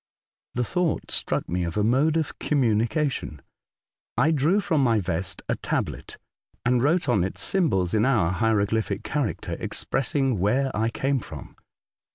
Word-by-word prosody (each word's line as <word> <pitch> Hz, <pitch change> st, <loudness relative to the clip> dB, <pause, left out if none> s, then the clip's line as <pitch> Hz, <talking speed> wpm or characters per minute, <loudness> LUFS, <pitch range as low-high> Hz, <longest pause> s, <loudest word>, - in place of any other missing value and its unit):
The 125 Hz, -, +1 dB
thought 175 Hz, +5 st, -1 dB
struck -, -, 0 dB
me 90 Hz, +1 st, -1 dB
of 85 Hz, +3 st, -3 dB
a 105 Hz, -, +2 dB
mode 135 Hz, +8 st, +3 dB
of 160 Hz, -2 st, -3 dB
com 145 Hz, -3 st, +1 dB
munication. 115 Hz, -, 0 dB, 0.8 s
I 145 Hz, +7 st, +4 dB
drew 160 Hz, +7 st, +3 dB
from 170 Hz, -8 st, +1 dB
my 115 Hz, -3 st, +3 dB
vest 90 Hz, -1 st, -3 dB
a -, -, 0 dB
tablet, -, -, -3 dB, 0.5 s
and 120 Hz, 0 st, +3 dB
wrote 165 Hz, +6 st, +2 dB
on 100 Hz, -, +3 dB
it 95 Hz, -, -4 dB
symbols 95 Hz, -, +1 dB
in 110 Hz, -1 st, +3 dB
our 110 Hz, -10 st, +2 dB
hieroglyphic 105 Hz, 0 st, 0 dB
character 140 Hz, -7 st, -2 dB
expressing 135 Hz, -4 st, -1 dB
where 130 Hz, +8 st, +1 dB
I 110 Hz, +1 st, +1 dB
came 135 Hz, +3 st, 0 dB
from. -, -, -10 dB
120 Hz, 155 wpm, -25 LUFS, 105-145 Hz, 0.8 s, I